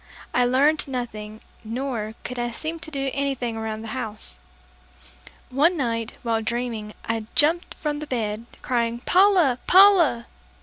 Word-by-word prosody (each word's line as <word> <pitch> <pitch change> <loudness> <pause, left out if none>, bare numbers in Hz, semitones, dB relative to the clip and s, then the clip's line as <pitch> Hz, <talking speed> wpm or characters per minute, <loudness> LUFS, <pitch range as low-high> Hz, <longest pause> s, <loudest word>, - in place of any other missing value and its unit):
I 245 - +3
learned 285 +5 +3
nothing, 220 -4 -5 0.2
nor 225 -2 -4
could 250 -1 -5
I 240 0 -1
seem 315 +8 -4
to 320 0 -5
do 275 -3 -2
anything 270 -4 -1
around 220 0 -4
the 225 - -7
house. 215 - -6 1.1
One 315 +7 +3
night, 230 -4 -2
while 225 -2 0
dreaming, 225 -2 -3
I 225 -1 -2
jumped 325 +4 +2
from 295 -2 -3
the 300 - -6
bed, 225 -3 -3 0.2
crying, 235 -2 0
"Paula! 360 -9 +4
Paula!" 360 -11 +6
245 Hz, 140 wpm, -24 LUFS, 225-295 Hz, 1.1 s, Paula